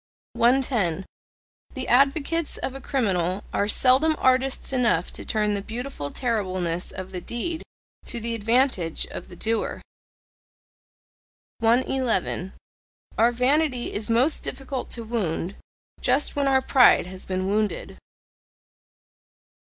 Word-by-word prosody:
110. 235 - +2 0.7
The 260 - -4
advocates 285 +5 +2
of 265 - -4
a 270 - -8
criminal 195 -8 0
are 200 - +1
seldom 265 +8 +4
artists 260 +1 +1
enough 230 -9 +1
to - - -9
turn 210 -1 0
the 200 - -1
beautiful 225 - -5
terribleness 185 - -2
of 185 0 -7
the 180 -2 -5
deed 320 - -4 0.5
to 235 - -2
the 230 +1 -3
advantage 225 - +1
of - - -8
the 180 - -11
doer. 225 +4 -1 1.8
111. 230 -5 +1 0.6
Our 230 +2 +4
vanity 255 +1 +1
is 210 +2 -2
most 250 +7 +2
difficult 270 -1 -5
to 235 - -4
wound 200 -5 -2 0.5
just 295 - +1
when 285 -1 +1
our 265 -1 +3
pride 255 -9 +5
has 185 +1 -8
been 185 0 -2
wounded. 210 +1 -2
235 Hz, 120 wpm, -24 LUFS, 195-265 Hz, 1.8 s, pride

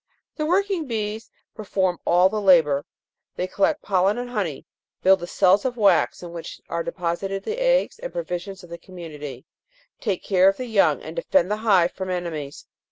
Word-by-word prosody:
The 305 -1 -2
working 375 -2 +1
bees 220 -2 -4 0.2
perform 190 -4 -1
all 180 +2 +5
the 210 +2 -2
labour; 160 -7 +4 0.5
they 180 - -2
collect 295 +11 0
pollen 195 +2 +2
and 245 0 -5
honey, 190 - -3 0.4
build 190 +1 +6
the 175 - -6
cells 190 +2 +3
of 250 -2 -2
wax 205 -4 +3
in 175 - -7
which 170 -1 -8
are 170 - -2
deposited 185 +3 -3
the 470 +3 -4
eggs - - +2
and - - -6
provisions 195 - -5
of 175 - -14
the 170 - -7
community, 150 -8 -9 0.5
take 200 -6 -2
care 190 -1 +4
of 195 - -2
the 255 - -4
young 220 -4 +2
and - - -8
defend 285 - +1
the 210 - 0
hive 195 -6 +3
from 190 0 -6
ene 180 -1 -1
mies. 150 -4 -6
195 Hz, 185 wpm, -23 LUFS, 175-230 Hz, 0.5 s, build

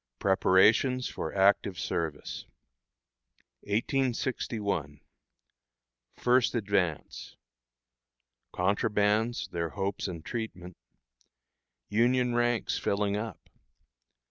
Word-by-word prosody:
PREPARATIONS 105 - +3
FOR - - -5
ACTIVE 95 -1 +3
SERVICE. 80 -3 -4 1.1
1861. 110 - -1 1.2
First 125 0 +2
Advance. 100 -7 -2 1.2
"Contrabands," 105 +4 +1
their 85 -1 -2
Hopes 100 +1 -3
and 85 -4 -7
Treatment. 95 -7 -6 1.1
Union 125 +3 +2
Ranks 120 -1 +1
Filling 100 0 0
Up. 105 -1 -6
105 Hz, 65 wpm, -29 LUFS, 95-120 Hz, 1.2 s, PREPARATIONS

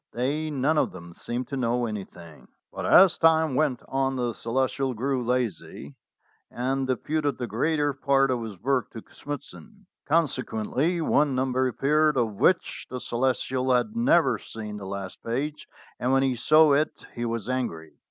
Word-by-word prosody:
They 145 +6 -1
none 150 +2 +1
of - - 0
them 85 -2 -11
seemed 120 +7 -4
to 140 - -4
know 120 -1 0
anything. 95 -7 -8 0.3
But - - -4
as 185 -2 +6
time 160 -2 +4
went 130 -3 0
on 135 0 0
the 120 -2 -1
Celestial 130 +2 -1
grew 130 +3 -1
lazy, 115 - -3 0.5
and 130 +2 -2
deputed 145 +2 -1
the 125 - -3
greater 145 +6 0
part 135 -1 +2
of 125 -2 -1
his 110 -5 -7
work 130 -1 0
to 115 - -8
Smithson. 125 - -9 0.2
Consequently 150 +1 0
one 145 -3 +2
number 130 0 +1
appeared 150 +4 +2
of 115 -4 +1
which 175 - +1
the 130 - -5
Ce - - -9
lestial 130 +1 +1
had 215 - -3
never 235 -8 +3
seen 105 -2 -7
the 100 -2 -8
last 95 -1 -6
page, 145 +6 -3 0.3
and 125 - 0
when 135 0 +3
he 135 -1 +1
saw 155 +5 +5
it 150 +2 0
he 120 - -5
was 115 -2 -3
angry. 120 -12 -3
130 Hz, 165 wpm, -26 LUFS, 115-145 Hz, 0.5 s, as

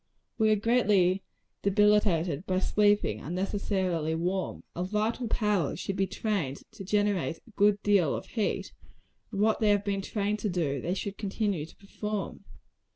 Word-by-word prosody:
We 220 0 +4
are 215 - +5
greatly 205 -4 +3 0.4
debilitated 200 -6 +2
by 185 - +1
sleeping 205 - +2
unnecessarily 185 -2 -1
warm. 180 +3 -2
Our 175 - -2
vital 215 +5 -1
powers 210 -9 0
should 195 - -3
be 195 0 +1
trained 185 -10 -2
to 220 -3 -9
generate 200 -4 0
a 230 - -21
good 205 0 +3
deal 195 -7 +3
of - - -5
heat; 220 -4 -2 0.6
and 200 -2 -2
what 220 0 +3
they 215 - +3
have 205 0 +3
been 200 -1 0
trained 210 +1 -1
to 210 - -1
do, 150 -7 -1
they 180 +2 -1
should 200 +1 -5
continue 200 -6 -1
to - - -17
perform. 210 0 -5
200 Hz, 160 wpm, -29 LUFS, 180-210 Hz, 0.6 s, are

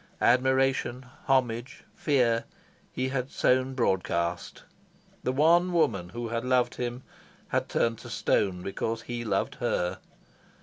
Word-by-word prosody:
Admiration, 130 0 +2 0.2
homage, 125 -2 0
fear, 120 -6 +1 0.5
he 130 +1 -2
had 130 -1 -2
sown 130 0 +1
broadcast. 90 -6 -1 0.6
The 130 - 0
one 170 +6 +4
woman 100 - +1
who 120 +4 -5
had 115 0 -2
loved 125 -1 +2
him 125 +1 -4 0.5
had - - -1
turned 115 -1 0
to 120 - -10
stone 95 -4 0
because 110 +4 -3
he 120 -1 -4
loved 110 - 0
her. 90 +1 0
120 Hz, 125 wpm, -28 LUFS, 115-130 Hz, 0.6 s, one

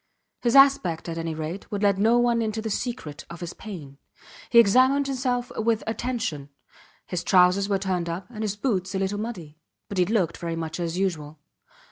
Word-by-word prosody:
His 240 +1 +1
aspect, 270 -14 +5
at 165 0 -4
any 165 -1 -3
rate, 160 +5 -6
would 205 0 -2
let 200 -1 +3
no 225 +4 +4
one 240 -1 +2
into 220 0 -2
the 220 0 -3
secret 200 - -4
of 170 0 -9
his 175 0 -6
pain. 150 -10 -9 0.5
He 235 - +3
examined 255 +6 +5
himself 250 -2 -1
with 225 0 0
attention. 225 - -3 0.6
His 180 -2 -3
trousers 185 +2 +4
were 200 - +2
turned 185 -3 -2
up, 175 +3 -4
and 220 -2 -5
his 210 -2 -1
boots 195 -5 -1
a - - +1
little 195 +1 -1
muddy, 175 -9 -6 0.3
but 200 - -3
he 180 - +4
looked 190 -6 0
very 170 -1 -4
much 165 +1 -4
as 170 0 -2
usual. 160 -6 -2
195 Hz, 190 wpm, -25 LUFS, 170-230 Hz, 0.6 s, aspect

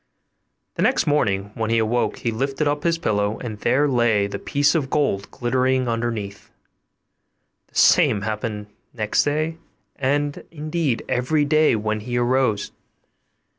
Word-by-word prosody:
The - - -1
next - - +2
morning 100 -9 0
when 110 -1 -2
he 115 - +2
awoke 115 +2 0
he 115 - -2
lifted 135 +6 -1
up 145 0 0
his 170 +1 +1
pillow, 105 -7 0
and 110 -4 -7
there 145 +7 +2
lay 120 -6 +2
the 100 - -5
piece 145 0 +1
of 150 -6 -1
gold 135 -11 0
glittering 130 +1 0
underneath; 115 -4 -3 1.2
the - - -31
same 100 - +4
happened 105 -1 -3 0.3
next 110 -3 +1
day, 155 +3 -1 0.4
and 145 +2 -1
indeed 155 -4 -2
every 145 +5 +1
day 155 -2 +3
when 110 0 -2
he 120 +3 -4
arose. 120 -4 +1
125 Hz, 140 wpm, -22 LUFS, 110-145 Hz, 1.2 s, same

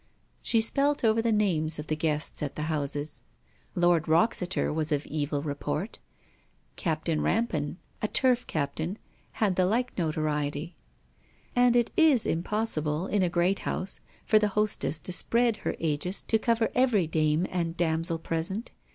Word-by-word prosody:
She 230 - +2
spelt 280 +5 +1
over 225 0 +4
the 230 0 +1
names 165 -7 +1
of 150 - -5
the 155 - -1
guests 150 -1 -1
at 145 -2 -3
the 150 - -3
houses. 150 -1 -3 0.5
Lord 175 -3 +3
Wroxeter 180 0 +2
was 155 0 -1
of 145 -1 0
evil 145 -1 -2
report: 155 +7 -3 0.8
Captain 160 -2 -1
Rampan, 175 -10 0 0.2
a 215 - +1
Turf 250 +1 +2
captain, 160 +5 -2 0.4
had 200 -5 0
the 185 -1 +4
like 245 +5 0
notoriety. 155 0 -1 0.8
And 245 -1 +4
it 240 -1 +2
is 305 -8 +4
impossible 165 -3 -1
in 205 0 +1
a 180 - +2
great 175 +3 +1
house 185 - -3 0.3
for 215 - +5
the 210 - +2
hostess 210 -6 +1
to 180 - -4
spread 235 +3 +2
her - - -3
aegis 165 +4 -1
to 220 - +1
cover 230 0 +1
every 250 -8 +3
dame 155 +1 +1
and 170 -2 -2
damsel 165 0 0
present. 165 +7 -3
175 Hz, 150 wpm, -28 LUFS, 155-220 Hz, 0.8 s, for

